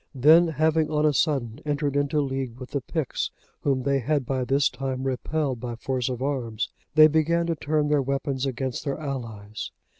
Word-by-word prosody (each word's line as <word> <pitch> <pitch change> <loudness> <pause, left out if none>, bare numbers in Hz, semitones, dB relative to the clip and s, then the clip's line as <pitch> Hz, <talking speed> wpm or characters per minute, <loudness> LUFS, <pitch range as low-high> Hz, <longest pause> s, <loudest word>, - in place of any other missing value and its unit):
Then, 160 +6 +6
having 160 0 +2
on 155 0 +1
a 150 - +4
sudden 135 -5 0
entered 145 -1 -1
into 145 +1 +1
league 135 -3 -3
with 130 0 -9
the 140 -1 -1
Picts, 155 0 -2 0.3
whom 135 -3 0
they 140 0 +2
had 140 +1 0
by 130 0 -1
this 135 +3 +3
time 130 -1 -3
repelled 135 +1 -1
by 120 0 -5
force 125 +1 -2
of 125 0 -3
arms, 120 -6 -2 0.3
they 155 -1 +9
began 160 +2 +2
to 165 -1 0
turn 150 0 0
their 150 -1 +3
weapons 135 0 -1
against 130 -1 -3
their 140 -2 -2
allies. 115 -8 -5
140 Hz, 185 wpm, -25 LUFS, 130-150 Hz, 0.3 s, they